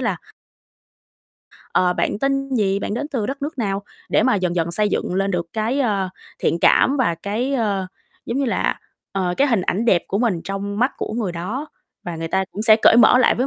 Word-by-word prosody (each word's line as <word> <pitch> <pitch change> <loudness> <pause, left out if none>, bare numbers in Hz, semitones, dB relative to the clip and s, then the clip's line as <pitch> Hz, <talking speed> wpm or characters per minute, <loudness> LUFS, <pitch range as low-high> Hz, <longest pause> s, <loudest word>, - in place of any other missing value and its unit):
là - - 0 1.6
ờ, 180 -1 +3
bạn 200 - -1
tên 275 +1 0
gì, 200 -2 +1
bạn 205 - -3
đến 290 +5 -3
từ 240 -8 -2
đất 275 +2 -5
nước 290 -1 -4
nào 200 -3 -1 0.3
để - - +3
mà 255 -1 +3
dần 180 -3 0
dần 170 0 0
xây 210 +3 +1
dựng 180 - -2
lên 195 +1 0
được 170 -2 -1
cái, 230 +6 -1
ơ, 200 -6 0 0.3
thiện 170 - 0
cảm 280 - +4
và 230 -11 +1
cái, 215 +10 -2
ơ, 205 -6 0 0.4
giống 235 - -2
như 280 - +1
là, 240 - -1 0.3
ờ, 185 -2 -1
cái 280 - +3
hình 225 -8 +2
ảnh 210 +5 -1
đẹp 185 -7 +3
của 200 - -1
mình 215 -9 +1
trong 200 +2 -4
mắt 250 +3 +2
của - - -4
người 220 -6 -2
đó 215 - -4 0.4
và 175 -2 -5
người 165 0 -4
ta 190 +3 +1
cũng 210 - -4
sẽ 220 -1 +6
cởi 225 - +7
mở 245 +1 +7
lại 255 - +4
với 255 +3 0
210 Hz, 225 wpm, -21 LUFS, 190-250 Hz, 1.6 s, cởi